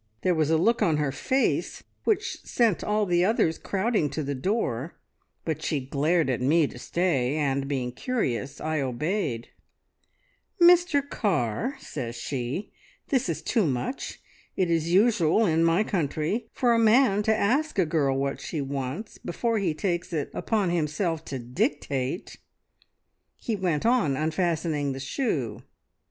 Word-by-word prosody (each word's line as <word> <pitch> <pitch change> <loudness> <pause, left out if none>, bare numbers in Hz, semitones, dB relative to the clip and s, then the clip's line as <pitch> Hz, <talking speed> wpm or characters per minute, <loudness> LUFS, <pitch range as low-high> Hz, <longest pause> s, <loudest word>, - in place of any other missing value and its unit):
There 180 - +3
was 155 -2 +1
a 160 - +4
look 230 +9 +2
on 160 -3 +3
her 150 -2 0
face 260 - 0 0.2
which 425 -1 0
sent 230 -7 +1
all 210 0 +1
the 175 -2 +2
others 185 -5 +2
crowding 200 -5 0
to 150 +2 -3
the 140 0 -2
door, 140 - -2 0.5
but 160 -3 -2
she 150 - 0
glared 150 +5 +1
at 130 -2 -1
me 155 +5 +4
to 125 - -7
stay, 145 -5 0
and, 140 -2 0
being 130 -3 -2
curious, 135 - -2
I 155 -1 -1
obeyed. 135 - -2 1.1
"`Mr 345 -5 +5
Carr,' 200 - -1
says 120 - -6
she, 130 - -4 0.4
`this 260 -9 +2
is 165 - -3
too 215 -8 +2
much! 135 - -3 0.4
It 180 -3 +1
is 165 0 +1
usual 205 0 +4
in 165 -2 +2
my 165 +5 +3
country 170 - -1
for 245 -2 +2
a 230 - +3
man 225 -2 +4
to 220 +1 +2
ask 275 +8 +1
a 185 - +4
girl 145 -4 +1
what 140 0 -2
she 160 - -4
wants, 140 - -4
before 230 +5 -1
he 175 -6 0
takes 175 +1 -2
it 150 -3 -2
upon 205 -6 0
himself 165 0 -1
to 135 - -4
dictate!' 135 - -2 1.0
"He 225 - -2
went 180 -5 -1
on 225 - +3
unfastening 155 -2 0
the 135 - -6
shoe. 135 - -2
165 Hz, 150 wpm, -26 LUFS, 140-210 Hz, 1.1 s, `Mr